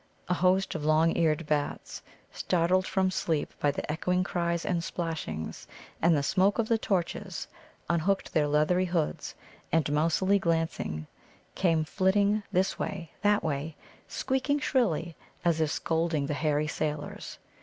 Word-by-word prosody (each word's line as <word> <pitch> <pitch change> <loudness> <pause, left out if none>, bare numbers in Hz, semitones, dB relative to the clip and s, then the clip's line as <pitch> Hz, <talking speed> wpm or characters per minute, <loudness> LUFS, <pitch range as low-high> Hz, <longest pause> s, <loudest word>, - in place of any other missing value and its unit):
A 180 - +1
host 185 +2 +2
of 160 - -4
long 155 +2 +3
eared 160 -1 +1
bats, 150 -1 -2 0.3
startled 185 +2 +1
from 190 -1 +1
sleep 160 -4 -1
by 145 - +2
the 140 - -3
echoing 180 +4 0
cries 170 -2 -1
and 170 -3 0
splashings, 165 - -4 0.3
and 165 -1 +4
the 140 - 0
smoke 190 +7 +2
of 230 -2 +1
the 230 -1 +2
torches, 190 -1 -2 0.4
unhooked 175 +4 0
their 150 -1 +3
leathery 155 +5 +2
hoods, 170 -4 -2 0.4
and, 160 -2 +3
mousily 170 +6 +2
glancing, 165 - -1 0.5
came 165 -4 +2
flitting 200 +5 +2
this 185 +2 +1
way, 175 -5 -4
that 205 0 +3
way, 150 0 -2 0.3
squeaking 265 +2 0
shrilly 195 - 0 0.3
as 165 -2 +2
if 155 - +2
scolding 160 -2 0
the 150 - -2
hairy 150 +1 +1
sailors. 150 -1 -4
170 Hz, 145 wpm, -29 LUFS, 155-190 Hz, 0.5 s, and